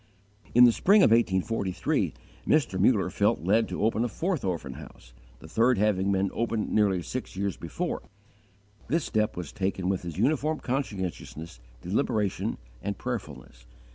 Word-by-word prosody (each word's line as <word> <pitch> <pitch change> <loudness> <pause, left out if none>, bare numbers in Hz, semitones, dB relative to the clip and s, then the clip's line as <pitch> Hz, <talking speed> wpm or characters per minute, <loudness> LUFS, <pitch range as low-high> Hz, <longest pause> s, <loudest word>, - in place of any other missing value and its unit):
In 120 - +9
the 120 - +8
spring 200 - +5
of - - +5
1843, 100 -4 +1 0.3
Mr. 135 -11 +2
Muller 100 -1 +3
felt - - +1
led 110 +5 +2
to - - -3
open 110 +1 +2
a - - +1
fourth 175 - -2
orphan 85 -8 -3
house, 65 -4 -13 0.2
the 80 - -13
third 115 +7 +3
having 100 -1 +2
been 95 0 +1
opened 115 -2 -1
nearly 100 -5 +2
six - - -5
years 100 -1 -2
before. - - -4 0.9
This 160 +5 0
step 110 -4 0
was 85 -5 -5
taken 95 -1 -2
with 95 -2 0
his 85 -2 -7
uniform 150 +7 +1
conscientiousness, 95 - -4 0.2
deliberation, 105 0 -1 0.2
and 100 +6 -3
prayerfulness. 70 - -6
100 Hz, 150 wpm, -27 LUFS, 90-120 Hz, 0.9 s, In